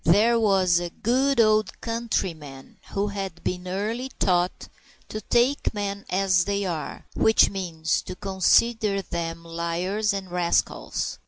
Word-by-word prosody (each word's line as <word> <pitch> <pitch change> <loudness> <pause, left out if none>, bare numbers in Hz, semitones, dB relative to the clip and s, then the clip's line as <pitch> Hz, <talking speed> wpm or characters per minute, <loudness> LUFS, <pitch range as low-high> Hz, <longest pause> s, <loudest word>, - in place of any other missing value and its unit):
There 220 +8 +4
was 190 -5 +3
a 175 0 -4
good 260 +8 +1
old 215 -3 +3
countryman 175 - -4
who 200 +1 0
had 195 -4 -6
been 180 0 -3
early 215 +7 -3
taught 180 -1 +1 0.4
to 215 - -5
take 240 +4 +1
men 200 -1 -3
as 185 -1 +2
they 200 0 -1
are, 165 -4 -5
which 220 - +4
means 165 -5 -1
to - - -5
consider 200 +2 +2
them 165 -1 -5
liars 170 +6 -1
and 195 -2 -5
rascals. 175 -1 -1
195 Hz, 135 wpm, -25 LUFS, 175-215 Hz, 0.4 s, There